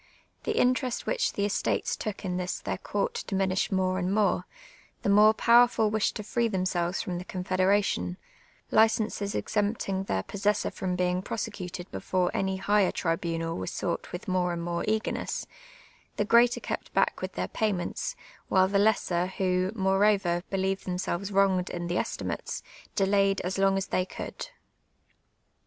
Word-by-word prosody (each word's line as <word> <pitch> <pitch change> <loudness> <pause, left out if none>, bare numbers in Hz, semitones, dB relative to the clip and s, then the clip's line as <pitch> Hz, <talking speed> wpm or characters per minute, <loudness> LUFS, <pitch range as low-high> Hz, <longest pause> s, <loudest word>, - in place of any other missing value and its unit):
The - - -1
interest 250 0 +1
which - - 0
the 200 - 0
estates 205 - 0
took 210 -1 -5
in 180 -1 -1
this 180 0 -2
their - - -4
coui't 480 -1 -2
diminished 195 -1 0
more 185 -1 +1
and 180 0 -1
more; 205 0 +1 0.6
the - - +1
more 210 +2 +7
powerful 235 -1 +4
wished 215 -1 +1
to 210 - -4
free 235 +3 0
themselves 185 -3 -1
from 175 -1 -3
the - - -6
confederation; 185 - 0 0.5
licenses 220 -2 +2
exempting 205 -2 -1
their 95 - -1
possessor 205 +1 0
from 180 -1 -2
being 180 0 +1
prosecuted 185 -3 -5
before 180 -1 0
any 190 0 0
higher 200 0 +3
tribunal 165 -1 -1
were 95 - -4
sought - - -3
with 180 - -6
more 180 -1 +1
and 170 0 -4
more 170 0 -2
eagerness; 215 0 -1 0.7
the 210 - 0
greater 235 +2 +5
kept - - -5
back - - +2
with - - -4
their - - -2
payments, 215 - -2 0.3
while 185 0 +4
the 200 +1 +2
lesser, 185 -4 +2
who, 185 0 0
moreover, 195 -3 +2
believed 195 0 -1
themselves 180 +1 -2
^^Tonged 190 -2 +2
in 175 0 -4
the 175 +1 0
estimates, - - -4 0.3
delayed 195 0 +3
as 185 +2 -3
long 195 0 +3
as 195 - -1
they 185 0 -1
could. - - -7
190 Hz, 155 wpm, -28 LUFS, 180-210 Hz, 0.7 s, more